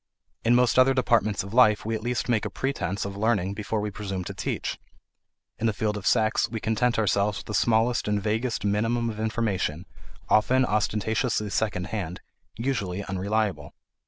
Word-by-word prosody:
In 120 +1 +4
most 125 0 +4
other 130 +1 +5
departments 115 -6 +2
of 100 +2 -9
life 110 -5 +5
we 115 - -1
at 110 - -2
least 120 +1 -2
make 115 -5 +1
a - - -2
pretence 100 -9 -2
of 100 -1 -5
learning 100 -3 +1
before 105 +1 -3
we 105 0 -3
presume 95 -2 -4
to - - -6
teach; - - -3 0.8
in 115 - +1
the 110 - +1
field 105 +1 -1
of 100 -2 -4
sex 110 -2 +2
we 110 - -4
content 115 +3 +1
ourselves 100 -1 +1
with - - -8
the 105 - -6
smallest 115 +2 +2
and 105 0 +1
vaguest 110 +3 -1
minimum 115 +3 +1
of 110 - -9
information, 100 -7 -1 0.4
often 130 +4 +3
ostentatiously 105 0 0
second 100 -5 -1
hand, 90 -5 -3 0.4
usually 105 -6 -2
unreliable. 95 -5 -2
110 Hz, 175 wpm, -26 LUFS, 100-115 Hz, 0.8 s, other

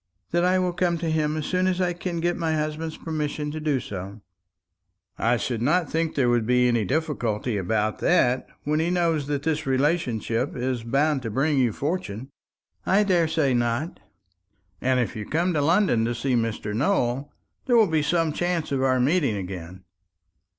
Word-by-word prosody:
"That 175 +1 +2
I 180 +1 +3
will 180 -1 0
come 175 -1 +1
to 165 -1 -2
him 155 -1 0
as 155 - -3
soon 185 0 +1
as 185 -1 0
I 180 -1 +1
can 175 -1 -4
get 175 +1 +1
my 160 -2 -1
husband's 155 +1 -3
permission 150 -2 -3
to 155 - -5
do 150 -3 0
so." 100 -1 -7 1.0
"I 120 +1 +2
should 115 -1 -3
not 150 +4 +1
think 165 0 -1
there 130 -3 +2
would 120 -2 +2
be 125 0 +4
any 120 -3 +1
difficulty 125 - -1
about 105 +3 -1
that, 130 -8 +2 0.2
when 150 +1 0
he 165 +2 +1
knows 165 -5 +1
that 145 -1 -2
this 155 -1 -1
relationship 130 -4 0
is 125 -2 -2
likely 140 +4 +2
to 120 -3 -5
bring 140 +6 +1
you 125 -3 +3
fortune." 135 - -4 0.5
"I 200 +3 +3
daresay 160 -7 +2
not." 120 +6 -1 0.8
"And 130 0 +2
if 120 0 -1
you 105 - -4
come 170 +9 0
to 150 - +1
London 165 - +3
to 120 +1 -1
see 130 +2 -1
Mr. 115 -3 -1
Nowell, 135 - 0 0.4
there 245 -2 +4
will 225 - +6
be 160 -4 +1
some 160 +1 +1
chance 175 -2 -1
of 135 -1 0
our 130 -1 +2
meeting 140 - +2
again." 90 -1 -7
145 Hz, 185 wpm, -25 LUFS, 120-165 Hz, 1.0 s, will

